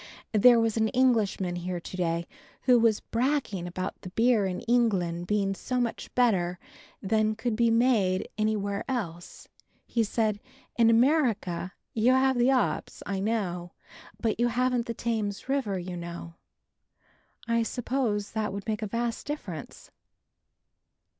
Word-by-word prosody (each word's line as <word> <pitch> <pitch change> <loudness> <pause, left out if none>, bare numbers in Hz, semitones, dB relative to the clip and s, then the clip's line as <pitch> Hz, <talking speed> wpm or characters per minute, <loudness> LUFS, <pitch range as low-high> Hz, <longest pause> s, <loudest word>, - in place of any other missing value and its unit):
There 235 +3 +7
was 225 -1 +1
an 220 0 +3
Englishman 215 -8 +1
here 175 0 -3
to 170 - -9
day 170 -2 -1 0.4
who 250 -2 +5
was 225 -2 +3
bragging 235 -7 -1
about 185 +2 -5
the 185 - -7
beer 225 0 +3
in 180 -1 -4
England 190 -8 +1
being 200 -1 +1
so 250 +6 -3
much 240 -2 -3
better 185 -8 +2 0.5
than 215 +2 +1
could 225 0 -2
be 235 +1 +3
made 225 -6 +2
anywhere 205 -2 -1
else. 175 -10 -5 0.4
He 230 - 0
said, 215 -1 0 0.4
"In 230 -1 +5
America, 230 - +2 0.2
you 235 +3 +3
have 260 -1 +3
the 240 +2 +4
'ops, 255 -4 0
I 195 -1 -2
know, 190 -5 -2 0.5
but 220 0 -1
you 240 - +3
haven't 245 0 0
the 230 - -3
Thames 215 -3 -2
water, 265 -8 0
you 180 0 -5
know." 170 -1 -7 1.1
I 230 0 +2
suppose 230 -3 -1
that 215 -1 -2
would 200 0 -6
make 215 -1 -2
a 215 - -2
vast 235 +4 -3
difference! 190 - -7
220 Hz, 145 wpm, -28 LUFS, 190-240 Hz, 1.1 s, There